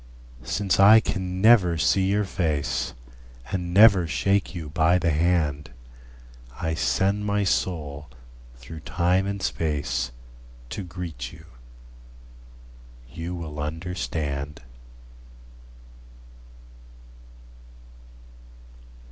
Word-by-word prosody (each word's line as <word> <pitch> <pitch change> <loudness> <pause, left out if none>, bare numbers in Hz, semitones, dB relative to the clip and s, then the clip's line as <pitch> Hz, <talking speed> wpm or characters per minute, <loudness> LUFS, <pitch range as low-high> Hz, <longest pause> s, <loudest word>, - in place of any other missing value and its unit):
Since 95 +9 0
I 105 +3 +8
can 95 -3 -3
never 100 -7 +5
see 95 +4 +2
your 105 +1 +2
face, 75 -9 -2 0.6
And 90 -2 -3
never 100 -3 +6
shake 90 +9 0
you 80 -3 -6
by 80 +4 +3
the 85 -2 +1
hand, 75 -3 0 0.9
I 80 -2 -1
send 95 +10 0
my 105 0 0
soul 75 -7 -2 0.5
through 60 +7 -10
time 90 +4 0
and 100 -1 -4
space 70 -5 -1 0.6
To - - -4
greet 90 -2 -7
you. - - -14 1.7
You 85 +2 -5
will 80 -3 -7
understand. 75 -2 -4
85 Hz, 90 wpm, -25 LUFS, 75-95 Hz, 1.7 s, I